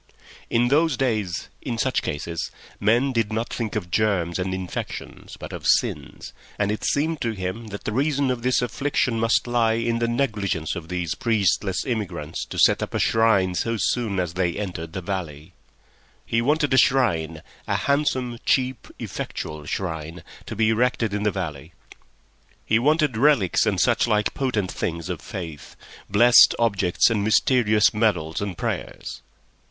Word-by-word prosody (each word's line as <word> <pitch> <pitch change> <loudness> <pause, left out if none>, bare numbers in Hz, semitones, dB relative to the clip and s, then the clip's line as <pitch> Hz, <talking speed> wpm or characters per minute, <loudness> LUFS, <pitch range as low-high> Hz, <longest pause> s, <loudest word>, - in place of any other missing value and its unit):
In 120 +1 +2
those 155 +1 +3
days, 110 -9 -1
in 120 - -4
such - - +1
cases, 85 +3 -4 0.3
men 120 +7 +2
did 115 -4 0
not 110 +2 -2
think 115 -3 -3
of 90 -5 -4
germs 95 -5 +1
and 95 0 -2
infections, 95 -1 -6
but - - -8
of - - -5
sins, - - 0 0.2
and 100 0 0
it 105 - -4
seemed 155 +2 0
to 115 -1 -1
him 95 +3 -5
that 100 -1 -7
the - - -3
reason 140 +2 +1
of 125 -2 -3
this 125 0 +1
affliction 125 -1 0
must 115 0 +2
lie 120 -2 +2
in 115 0 0
the 120 - +1
negligence 105 - -1
of 85 -3 -7
these 90 -3 -2
priestless 100 -4 0
immigrants 100 - -3
to - - -8
set - - +4
up - - -4
a - - +1
shrine 110 -5 +3
so 115 +6 -1
soon 105 0 0
as 90 -2 -2
they 90 -1 0
entered 85 -5 -5
the 95 -1 -5
valley. 85 -6 -5 0.7
He 115 - +1
wanted 145 +2 +1
a - - +4
shrine—a 85 - 0
handsome, 130 -4 0
cheap, 130 -2 0
effectual 75 -1 -6
shrine—to 80 -2 -6
be 110 0 +2
erected 115 -1 +1
in 105 - -1
the 105 - +2
valley; 80 -4 -5 0.9
he 110 - +3
wanted 150 -2 +2
relics 120 - +3
and - - +1
such - - +3
like 105 -2 +1
potent 110 -9 -1
things 85 -1 -4
of - - -4
faith, 80 -6 -8 0.3
blessed 120 +4 +7
objects 100 -3 +2
and 105 -3 0
mysterious 110 -1 +3
medals 105 -5 0
and 100 -4 -4
prayers. - - -4
110 Hz, 160 wpm, -23 LUFS, 90-120 Hz, 0.9 s, blessed